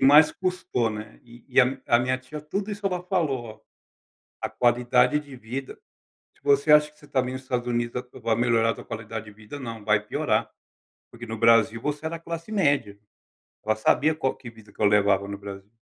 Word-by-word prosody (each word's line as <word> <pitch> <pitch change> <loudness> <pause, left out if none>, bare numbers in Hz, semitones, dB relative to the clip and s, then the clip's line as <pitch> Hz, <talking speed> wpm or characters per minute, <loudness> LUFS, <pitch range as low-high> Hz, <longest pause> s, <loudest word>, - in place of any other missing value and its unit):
mais 145 +3 +7
custou, 180 -11 -1
né. 105 0 -8
E 120 0 -16
e - - +5
a 130 +2 +1
a 120 - +5
minha 130 +1 0
tia, 150 +4 -9
tudo 195 +8 -4
isso 205 0 -3
ela 180 -2 -1
falou, 135 - -2 0.8
a - - -2
qualidade 125 +3 +3
de 140 -3 -12
vida, 125 +3 -6 0.6
"Se - - -30
você 140 +2 +4
acha 150 0 +6
que 150 - -29
você - - -18
está 135 -2 +1
me 125 0 -4
nos 130 0 -6
Estados 125 -2 -2
Unidos 120 +1 -1 0.2
vai 115 -1 +1
melhorar 115 -1 +3
a - - -2
tua - - -11
qualidade 110 -1 -6
de - - -10
vida? 110 +7 -10
Não, 115 -4 -7
vai 105 -1 +3
piorar". 105 - -1 0.6
Porque 120 0 -9
no 115 0 -5
Brasil 115 0 +4
você 150 +1 -3
era 165 +1 -3
classe 165 +4 -7
média, 140 - +1 0.7
ela 110 0 +1
sabia 150 +8 +3
qual 135 -4 -1
que 120 - -10
vida 110 -2 -17
que - - -18
eu - - +5
levava 100 -1 +3
no 100 0 -5
Brasil. 100 0 -9
125 Hz, 205 wpm, -25 LUFS, 110-150 Hz, 0.8 s, mais